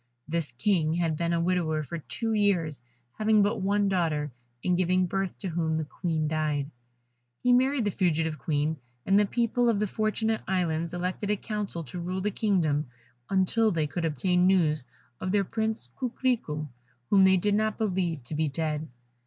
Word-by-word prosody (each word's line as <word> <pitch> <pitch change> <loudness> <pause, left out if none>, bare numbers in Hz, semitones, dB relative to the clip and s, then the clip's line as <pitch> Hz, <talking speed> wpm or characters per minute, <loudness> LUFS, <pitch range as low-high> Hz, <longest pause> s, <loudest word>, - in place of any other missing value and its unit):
This 160 -3 -2
King 160 - +1
had 165 -2 +1
been 170 +2 -1
a 170 - +1
widower 165 -3 +1
for 170 +3 -5
two 225 +8 -3
years, 180 - +1 0.4
having 215 -1 +4
but 205 +1 0
one 200 +1 +2
daughter, 160 -6 0 0.3
in 180 - +2
giving 185 +1 +2
birth 195 0 -2
to 190 - -4
whom 160 -1 0
the 160 -1 -1
Queen 160 0 -2
died. 150 -2 -1 0.7
He 250 - +5
married 260 -1 +3
the 205 - +1
fugitive 165 -4 0
Queen; 155 0 0 0.3
and 195 +1 +5
the 210 - +3
people 240 +2 +1
of 225 - +2
the 210 - +1
Fortunate 215 +2 0
Islands 170 -3 0
elected 185 +3 -2
a 210 - +2
council 205 -5 -4
to 155 +5 -7
rule 185 +2 -3
the 210 +2 0
kingdom 165 - +1 0.4
until 195 +4 +3
they 165 -6 0
could 170 +4 -3
obtain 180 +4 +2
news 155 -7 +2 0.3
of 185 - -2
their 205 0 +3
Prince 220 - -2
Coquerico, 235 - -1 0.4
whom 195 -2 +6
they 190 0 +6
did 205 +3 +1
not 215 +1 +1
believe 180 - -1
to 120 - -7
be 155 +1 +1
dead. 155 +1 -2
180 Hz, 180 wpm, -28 LUFS, 160-205 Hz, 0.7 s, whom